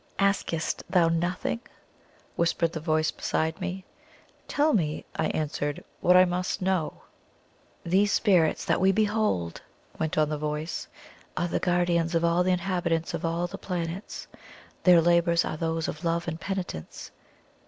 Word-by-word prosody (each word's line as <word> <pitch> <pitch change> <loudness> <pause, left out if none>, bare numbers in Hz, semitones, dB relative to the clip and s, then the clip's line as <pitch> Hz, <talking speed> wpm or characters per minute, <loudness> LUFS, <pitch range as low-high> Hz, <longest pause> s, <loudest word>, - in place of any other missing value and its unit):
"Askest 195 -5 0
thou 175 -3 +4
nothing?" 175 +6 -1 0.8
whispered 170 0 +1
the 160 - -3
voice 155 0 +1
beside 160 +4 -2
me. 185 +1 -4 0.6
"Tell 300 +2 +2
me," 155 -7 0
I - - 0
answered, 145 -1 -2 0.2
"what 180 +1 +5
I 185 - +7
must 180 +1 -2
know." 185 -4 -1 0.8
"These 195 +4 +3
spirits 180 -9 +3
that - - +1
we 190 +1 +5
behold," 210 - 0 0.4
went 160 -1 -1
on 155 -1 +3
the 150 -1 -2
voice, 150 +2 -3 0.5
"are 175 - +1
the - - -1
guardians 175 -2 +1
of 165 0 +2
all 170 +1 +3
the 185 - 0
inhabitants 175 -3 -1
of 170 - -4
all 165 +1 0
the 175 - -7
planets. 180 +1 -4 0.6
Their 175 -2 +7
labours 170 0 +3
are - - -3
those 165 0 -1
of 155 - -6
love 170 0 0
and 165 0 -4
penitence. 185 - -5
170 Hz, 150 wpm, -27 LUFS, 160-185 Hz, 0.8 s, I